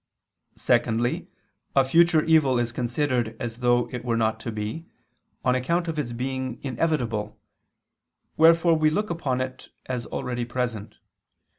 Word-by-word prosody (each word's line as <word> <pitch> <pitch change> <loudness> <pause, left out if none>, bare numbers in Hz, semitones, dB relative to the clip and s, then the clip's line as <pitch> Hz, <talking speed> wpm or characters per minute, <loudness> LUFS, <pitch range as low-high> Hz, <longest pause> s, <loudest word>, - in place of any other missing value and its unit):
Secondly, 115 +2 +1 0.5
a 135 -1 +5
future 165 +2 +4
evil 155 -6 +4
is 120 -1 0
considered 120 -1 -1
as 120 -2 -5
though 120 0 +2
it 125 -1 -5
were 120 -2 0
not 110 -1 +1
to 115 - -5
be, 110 +10 -5 0.6
on 125 - +4
account 170 +7 0
of 160 -2 -2
its 125 -5 -3
being 130 +1 -4
inevitable, 120 -6 -1 1.0
wherefore 165 +1 +5
we 155 -1 +3
look 210 +6 -1
upon 135 -7 -1
it 130 0 -6 0.2
as 125 -2 -4
already 120 -1 -3
present. 120 -3 -3
125 Hz, 140 wpm, -25 LUFS, 120-155 Hz, 1.0 s, a